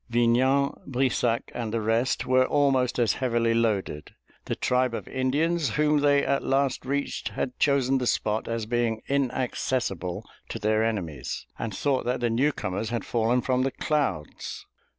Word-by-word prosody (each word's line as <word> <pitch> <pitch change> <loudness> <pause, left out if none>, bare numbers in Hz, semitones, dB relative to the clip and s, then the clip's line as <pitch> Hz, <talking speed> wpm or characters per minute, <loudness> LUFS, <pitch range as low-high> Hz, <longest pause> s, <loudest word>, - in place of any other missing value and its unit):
Vignan, 125 +4 +3 0.2
Brissac, 125 -3 0
and 115 -3 -3
the 115 - 0
rest 115 +4 0
were 130 0 +3
almost 135 -3 +2
as 120 -3 +3
heavily 115 -2 +2
loaded. 105 -10 -1 0.3
The - - -2
tribe 125 -1 +1
of - - -6
Indians 145 +5 0
whom 150 0 +3
they 145 -1 +3
at 140 - +1
last 135 -1 0
reached 140 +1 -2
had 125 - -4
chosen 135 -2 +3
the 125 - -1
spot 110 -1 0
as 115 -1 -2
being 115 -1 -1
inaccessible 125 - -1 0.2
to - - -4
their 110 +1 +1
enemies; 85 - -3
and 115 - -3
thought 140 -3 0
that 125 +1 0
the 120 -1 0
newcomers 115 -5 0
had 120 -1 -3
fallen 120 +2 +1
from 130 0 +1
the 135 - +1
clouds. 135 - -2
125 Hz, 155 wpm, -26 LUFS, 115-135 Hz, 0.3 s, Vignan